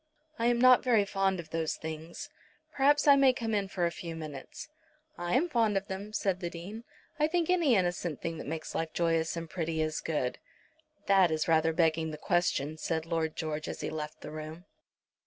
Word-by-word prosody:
"I 230 - +2
am 240 0 +3
not 255 0 +7
very 230 -5 +3
fond 195 -2 0
of 160 -2 -9
those 165 -1 -1
things. 160 - -7 0.4
Perhaps 290 +2 +3
I 285 - +9
may 270 -2 +5
come 225 -2 -3
in 200 -2 +1
for 180 -2 -1
a 170 - 0
few 170 -1 -7
minutes." 150 -4 -8 0.5
"I 175 +5 -2
am 310 +7 +3
fond 225 - +2
of 195 - -2
them," 195 +2 -5
said 195 -4 0
the 175 -2 -3
Dean. 195 +7 -8 0.3
"I 300 - +4
think 345 +1 +1
any 330 -9 +4
innocent 175 -4 -1
thing 165 -1 -4
that - - -7
makes 155 +1 -5
life 165 -1 -2
joyous 165 -1 +1
and 165 0 -4
pretty 160 -1 -3
is 155 0 -1
good." 150 -6 -2 0.7
"That 195 -3 +5
is 155 0 -1
rather 160 0 +3
begging 160 -1 +1
the 155 - -6
question," 155 -3 0
said 160 0 -2
Lord 165 -2 -1
George, 155 -2 -3
as - - -6
he - - -3
left 150 -1 -6
the - - -8
room. 155 +3 -8
170 Hz, 205 wpm, -30 LUFS, 160-215 Hz, 0.7 s, I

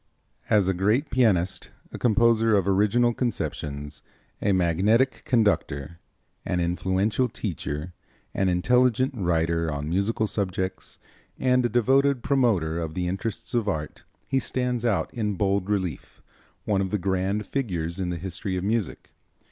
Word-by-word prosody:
As 100 -3 +4
a 95 - +2
great 105 - +1
pianist, 105 -7 +2 0.2
a - - -7
composer 115 -2 +3
of 100 -1 0
original 105 +5 +3
conceptions, 75 - -4 0.4
a 100 - +2
magnetic 95 +8 +2
conductor, 85 - 0 0.4
an 90 - -1
influential 95 +7 0
teacher, 85 -5 -5 0.4
an 95 -1 +1
intelligent 125 +7 +2
writer 85 -4 0
on 75 +1 -4
musical 105 +5 +1
subjects 95 -3 -3 0.4
and 125 -1 +2
a 120 - +1
devoted 130 +3 +2
promoter 105 - +1
of 80 -1 -4
the 90 -1 -1
interests 95 +4 -4
of 115 -4 +1
art, 75 -6 -4 0.2
he 135 - +1
stands 125 -2 -2
out 110 -4 0
in 105 -4 -1
bold 100 +1 0
relief, 95 -7 -3 0.4
one 100 -2 +1
of 95 - -1
the 105 - 0
grand 95 +2 -1
figures 90 -10 -3
in 90 -2 -1
the 85 - -3
history 95 +2 -4
of 90 - -3
music. 110 +1 -2
100 Hz, 140 wpm, -25 LUFS, 90-115 Hz, 0.4 s, As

